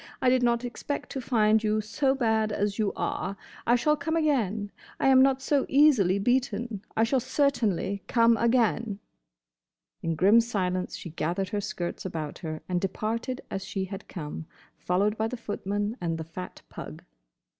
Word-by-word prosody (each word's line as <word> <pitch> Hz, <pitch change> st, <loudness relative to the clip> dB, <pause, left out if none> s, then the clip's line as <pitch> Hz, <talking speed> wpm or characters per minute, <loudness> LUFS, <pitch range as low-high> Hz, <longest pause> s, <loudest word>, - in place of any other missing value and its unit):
I 255 Hz, -, +3 dB
did 255 Hz, 0 st, +3 dB
not 240 Hz, 0 st, +2 dB
expect 265 Hz, +4 st, -5 dB
to 270 Hz, -, -3 dB
find 220 Hz, -3 st, +3 dB
you 215 Hz, 0 st, +2 dB
so 265 Hz, +6 st, 0 dB
bad 220 Hz, -4 st, +1 dB
as 205 Hz, 0 st, -1 dB
you 210 Hz, -2 st, +2 dB
are. 195 Hz, +2 st, -2 dB, 0.3 s
I 240 Hz, -, +5 dB
shall 300 Hz, +5 st, +3 dB
come 320 Hz, +2 st, -2 dB
again. 225 Hz, -, +1 dB, 0.3 s
I -, -, +3 dB
am 260 Hz, -1 st, +7 dB
not 265 Hz, 0 st, +3 dB
so 285 Hz, -1 st, +2 dB
easily 260 Hz, -10 st, +5 dB
beaten. 235 Hz, -2 st, 0 dB
I 225 Hz, -, +4 dB
shall 255 Hz, +4 st, +2 dB
certainly 230 Hz, -, 0 dB
come 230 Hz, -1 st, +4 dB
again!" 230 Hz, -2 st, +1 dB, 1.0 s
In 165 Hz, 0 st, -1 dB
grim 205 Hz, +8 st, +6 dB
silence 185 Hz, -5 st, -2 dB
she 170 Hz, -, -8 dB
gathered 175 Hz, +4 st, -2 dB
her 205 Hz, -, -1 dB
skirts 180 Hz, -4 st, -4 dB
about 160 Hz, -5 st, -5 dB
her 155 Hz, -3 st, -5 dB
and 180 Hz, -1 st, 0 dB
departed 225 Hz, +6 st, -2 dB
as 195 Hz, -, -3 dB
she 195 Hz, -1 st, -3 dB
had 195 Hz, +1 st, -8 dB
come, 160 Hz, -2 st, -6 dB, 0.3 s
followed 200 Hz, +4 st, +1 dB
by 220 Hz, -, +1 dB
the 250 Hz, -, -5 dB
footman 205 Hz, 0 st, -3 dB
and 165 Hz, -2 st, -1 dB
the 160 Hz, -, -4 dB
fat 175 Hz, +3 st, -8 dB
pug. -, -, -9 dB
215 Hz, 170 wpm, -27 LUFS, 190-245 Hz, 1.0 s, am